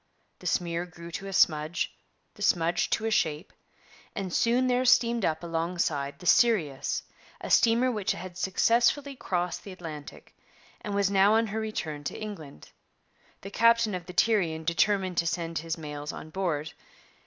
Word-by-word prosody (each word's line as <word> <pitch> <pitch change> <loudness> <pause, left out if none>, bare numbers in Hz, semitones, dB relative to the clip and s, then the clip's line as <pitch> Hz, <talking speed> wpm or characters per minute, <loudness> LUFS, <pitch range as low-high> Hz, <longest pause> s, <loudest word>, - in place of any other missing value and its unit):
The - - -7
smear 170 0 -1
grew 170 0 -11
to 195 +4 -6
a - - -5
smudge, 155 -2 +1 0.4
the 205 - -16
smudge 170 -3 +2
to 225 - 0
a 225 - 0
shape, 160 -3 0 0.6
and 190 -4 -4
soon 240 +2 +2
there 250 0 +2
steamed 240 -3 +3
up 160 -1 0
alongside 165 -4 -2
the 180 - -13
Sirius, 175 - +2 0.4
a - - -6
steamer 235 +2 +4
which 210 -5 -1
had 185 -1 -8
successfully 235 +9 +2
crossed 180 -7 -2
the 200 - -9
Atlantic, 160 -5 -9 0.5
and 205 -1 -3
was 200 -1 +2
now 200 +2 +5
on 225 +1 +3
her 220 +1 -3
return 160 -9 -4
to - - -4
England. 165 - -9 0.7
The 195 - -8
captain 230 -1 +4
of 180 -2 -5
the 180 - -8
Tyrian 175 -7 +2
determined 185 +2 +1
to 170 - +2
send 165 -1 -2
his 165 +1 -4
mails 150 -2 -6
on 155 - -9
board. 160 -4 -2
180 Hz, 165 wpm, -28 LUFS, 165-215 Hz, 0.7 s, now